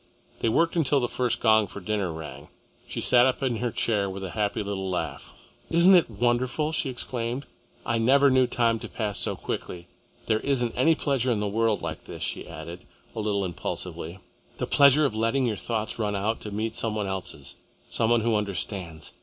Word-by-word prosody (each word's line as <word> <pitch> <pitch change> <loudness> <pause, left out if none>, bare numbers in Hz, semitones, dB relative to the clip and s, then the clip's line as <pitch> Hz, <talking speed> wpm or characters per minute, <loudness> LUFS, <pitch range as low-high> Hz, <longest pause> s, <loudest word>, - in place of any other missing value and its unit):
They 115 - +1
worked 165 +9 +2
until 150 -4 +3
the 120 - 0
first 125 0 -1
gong 110 -2 +4
for 95 - -8
dinner 100 -2 -1
rang. 75 -3 -8 0.4
She - - -4
sat 125 0 +5
up 130 +1 -1
in 125 -4 0
her 120 +2 -1
chair 105 -3 0
with 95 +1 -6
a 95 - -5
happy 105 -1 -1
little 95 -1 -3
laugh. 90 - -4 0.4
"Isn't 170 +3 +6
it 175 -7 +5
wonderful!" 120 +7 0
she 155 -3 -1
exclaimed. 120 +1 -3 0.4
"I 115 -1 0
never 135 +4 +5
knew 130 -1 +4
time 115 -2 +1
to 115 -1 -8
pass 105 -3 -3
so - - +1
quickly. 85 -1 -5 0.4
There 110 -1 +2
isn't 125 -4 0
any 160 +6 +4
pleasure 135 -4 0
in 110 - +1
the 105 - -1
world 110 0 +1
like 80 -1 -5
this," - - -7
she - - -4
added, 85 +4 -9 0.3
a - - -3
little 100 -2 0
impulsively, 85 0 -5 0.4
"the - - -1
pleasure 140 +1 +5
of 135 - 0
letting 115 +4 +1
your 115 -3 0
thoughts 110 +4 -3
run 105 -2 0
out 105 +3 -1
to 105 - -5
meet 110 +2 -3
some 115 -2 0
one 105 -1 -1
else's, 95 -2 -6 0.3
some 115 - +1
one 120 -1 +4
who 115 0 +1
understands. 95 -5 -3
115 Hz, 200 wpm, -26 LUFS, 100-125 Hz, 0.4 s, Isn't